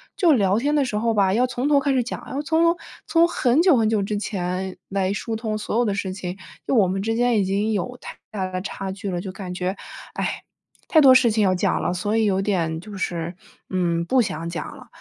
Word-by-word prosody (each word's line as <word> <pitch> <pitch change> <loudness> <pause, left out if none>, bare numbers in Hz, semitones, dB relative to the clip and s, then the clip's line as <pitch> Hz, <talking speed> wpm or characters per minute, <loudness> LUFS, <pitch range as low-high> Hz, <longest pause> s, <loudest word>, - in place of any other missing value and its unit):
就 345 -5 +4
聊 200 -6 +3
天 290 +4 0
的 285 -2 +3
时 215 - -4
候 230 +1 +1
吧， 195 -2 +3
要 245 +3 +3
从 250 +2 -2
头 290 -1 +5
开 280 - +1
始 255 - +3
讲， 245 - -6
要 280 +2 -2
从 320 +2 +2
头 335 +1 +3 0.3
从 335 0 +4
很 265 -2 +2
久 350 -6 +5
很 220 -1 +2
久 215 -2 +1
之 210 +1 -2
前 185 -2 -3
来 195 -1 0
疏 225 +2 -3
通 220 -1 -3
所 215 +1 -3
有 - - +4
的 205 - 0
事 190 -2 -3
情， 185 -1 -6 0.3
就 - - -1
我 200 -5 +5
们 195 +1 -2
之 225 +2 -1
间 240 -2 +2
已 - - +2
经 205 +3 0
有 245 +6 -3
太 - - -9 0.2
大 195 -3 -2
的 185 0 -3
差 195 -1 -5
距 195 0 -5
了， 175 -1 -2
就 190 - -6
感 185 -2 -6
觉， 185 +2 -2 0.4
哎， - - -3 0.4
太 315 - +5
多 265 -2 +8
事 250 -2 +5
情 215 -1 +2
要 185 -1 +3
讲 - - 0
了， 175 - 0
所 205 +4 -1
以 225 - +3
有 195 -1 +1
点 165 -5 -1
就 205 +2 -10
是， 170 -1 -3 0.3
嗯， 170 -2 0
不 255 +6 +3
想 165 -5 -3
讲 175 - -4
了。 250 -2 -14
205 Hz, 270 characters per minute, -23 LUFS, 185-245 Hz, 0.4 s, 多